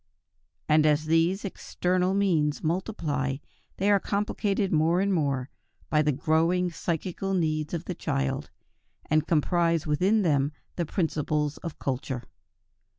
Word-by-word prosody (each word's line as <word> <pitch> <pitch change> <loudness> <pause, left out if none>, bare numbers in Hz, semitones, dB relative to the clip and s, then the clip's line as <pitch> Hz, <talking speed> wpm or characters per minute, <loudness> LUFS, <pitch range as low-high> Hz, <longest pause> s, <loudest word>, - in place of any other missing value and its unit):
And 155 0 +5
as 150 0 +2
these 165 +5 +2
external 185 0 -1
means 165 -7 +1
multiply, 155 -6 -1 0.4
they 200 +2 +2
are 200 - +5
complicated 200 -1 -1
more 165 +3 +3
and 200 +1 +1
more 140 -6 0 0.4
by 150 - +4
the 150 0 +2
growing 165 +5 +1
psychical 180 +3 -2
needs 155 -3 0
of 170 - -5
the 180 - -3
child, 135 -4 -2 0.6
and 155 0 +3
comprise 165 0 +2
within 190 +8 +2
themselves 145 -3 +1 0.2
the 170 -3 -2
principles 150 -3 -1
of 165 -3 -7
culture. 130 -2 -3
160 Hz, 130 wpm, -27 LUFS, 150-185 Hz, 0.6 s, And